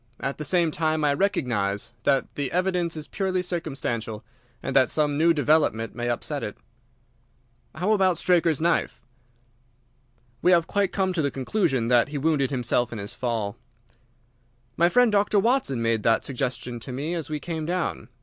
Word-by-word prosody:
At 135 +2 -4
the - - -3
same 170 +1 +2
time 155 0 0
I 145 -1 +3
recognise 115 - -1
that 135 -1 +1
the 140 -3 -3
evidence 180 -2 0
is 150 -1 -6
purely 185 +1 -1
circumstantial, 135 -11 -4 0.4
and - - -3
that 130 -1 +5
some 150 -2 +1
new 165 +3 +4
development 150 -7 +2
may 120 0 -3
upset 140 +4 -2
it." 105 - -5 1.2
"How 180 +7 0
about 190 -5 +3
Straker's 170 -4 +2
knife?" 170 +1 0 1.4
"We 180 - +5
have 170 -2 +4
quite 200 +1 0
come 190 -2 0
to 170 - 0
the 140 - +1
conclusion 135 - 0
that 120 -2 +4
he 145 0 -5
wounded 145 -2 +1
himself 125 -2 0
in 115 - -5
his 100 +3 -6
fall." 115 -5 -3 1.2
"My 170 +1 +4
friend 245 +2 +4
Dr. 205 0 +2
Watson 200 - +1
made 115 -1 +1
that 115 +1 +2
suggestion 125 -2 -3
to 115 - -8
me 145 +7 -3
as 165 -4 -4
we 150 -1 -3
came 160 0 -4
down. 180 0 -2
150 Hz, 170 wpm, -25 LUFS, 125-175 Hz, 1.4 s, that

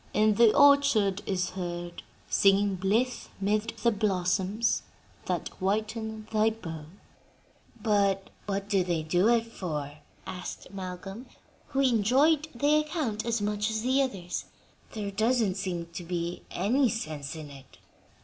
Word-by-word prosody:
In 215 0 +4
the 225 +1 +6
orchard 280 -9 +5
is 180 -2 -1
heard 175 -2 -5 0.3
Singing 195 0 +4
blithe 210 +7 0
'mid 210 +3 0
the 235 - +5
blossoms 200 +1 +1 0.5
that - - -1
whiten 220 +2 -2
thy 215 0 +3
bough."'" 165 -9 -7 0.9
"But 200 -2 +1 0.2
what 200 0 -2
did 195 -3 +1
they 165 -3 0
do 175 +6 +2
it 235 -1 +3
for?" 150 -9 -5 0.3
asked 180 0 -7
Malcolm, 195 +5 -7 0.4
who 270 - 0
enjoyed 270 +6 +3
the 290 +5 +3
account 295 -8 -2
as 230 -2 0
much 210 +1 0
as 220 0 -2
the 260 +2 +3
others. 190 -10 -3 0.5
"There 205 -2 -4
doesn't 220 0 +2
seem 180 -3 -3
to 175 - -5
be 170 0 -3
any 240 +8 +2
sense 155 -10 -4
in 155 -2 -8
it." 135 -2 -14
205 Hz, 135 wpm, -28 LUFS, 180-230 Hz, 0.9 s, the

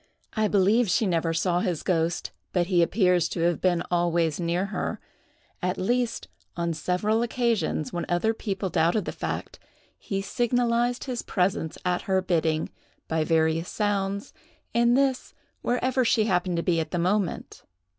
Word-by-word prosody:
I 215 -1 +1
believe 210 +3 +3
she 220 +5 +2
never 165 -3 +1
saw 175 +2 +1
his 180 -4 -1
ghost, 170 -1 0 0.2
but 175 -2 +2
he 180 -1 +3
appears 180 -1 +3
to 170 - -3
have 170 0 +1
been 175 -2 +2
always 170 -2 +1
near 175 +2 0
her; - - -2 0.6
at 180 +1 -1
least, 240 +4 -1 0.3
on 170 -1 0
several 180 +8 0
occasions 230 - 0
when 175 - -3
other 175 +6 +2
people 200 -3 -3
doubted 170 +5 +2
the - - -3
fact, - - -5 0.4
he 195 -1 -3
signalized 240 +2 +1
his 250 -3 -3
presence 180 -4 -1
at 180 0 +1
her 190 0 +4
bidding, 165 -4 0 0.4
by 160 -1 0
various 160 +1 +1
sounds, 200 -1 -1 0.4
and 235 +2 +4
this, 270 -2 0 0.3
wherever 255 +1 +1
she 225 -2 +3
happened 180 -4 0
to 170 - 0
be 170 -3 +2
at 160 -1 -2
the 175 - -2
moment. 185 +2 -1
185 Hz, 155 wpm, -26 LUFS, 170-220 Hz, 0.6 s, her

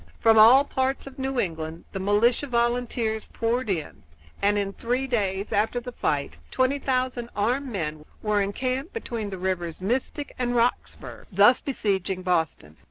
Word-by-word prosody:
From 225 -1 +5
all 245 +6 +8
parts 265 -1 -1
of 275 0 -11
New 265 -1 -1
England 165 -3 -3
the 195 - -4
militia 210 +7 +2
and - - -16
volunteers 235 -2 0
poured 235 +1 -1
in, 150 - -3 0.4
and 205 +1 +3
in 200 -1 -1
three 245 +5 -1
days 200 -5 -1
after 220 +4 +1
the 250 +1 -7
fight, 145 -11 -2
twenty 260 +2 +1
thousand 255 -3 -1
armed 250 +7 0
men 155 -9 -4 0.2
were 210 -1 +2
encamped 255 - -2
between 230 - -4
the 190 - -6
rivers 180 -3 -2
Mystic 255 +8 -2
and 245 -1 0
Roxburgh, 240 +1 -1
thus 205 +6 +5
besieging 195 -7 -1
Boston. 160 - -1
225 Hz, 160 wpm, -25 LUFS, 190-255 Hz, 0.4 s, all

